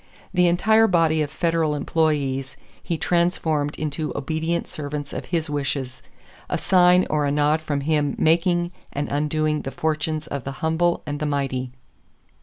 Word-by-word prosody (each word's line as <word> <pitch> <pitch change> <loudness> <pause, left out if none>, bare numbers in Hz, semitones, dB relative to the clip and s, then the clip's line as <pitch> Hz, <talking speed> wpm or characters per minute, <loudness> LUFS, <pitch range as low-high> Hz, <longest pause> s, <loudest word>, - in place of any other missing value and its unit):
The 180 -1 +4
entire 220 +6 +4
body 165 -4 +3
of 150 - -1
federal 165 -1 0
employees 140 -4 0 0.2
he 170 - -2
transformed 160 -4 0
into 155 0 -3
obedient 160 +4 -2
servants 145 -1 -5
of - - -5
his 165 -3 -1
wishes, 135 -3 -3 0.5
a - - 0
sign 180 -1 +4
or 150 -1 +1
a - - 0
nod 150 +2 +2
from 145 -2 -2
him 150 -1 0
making 175 +1 +2 0.2
and 145 +1 -2
undoing 150 +1 0
the - - -5
fortunes 155 +1 -2
of 140 -4 -5
the 135 - -5
humble 170 +2 +1
and 145 0 -4
the 150 - -1
mighty. 135 -3 -2
155 Hz, 155 wpm, -23 LUFS, 145-165 Hz, 0.5 s, The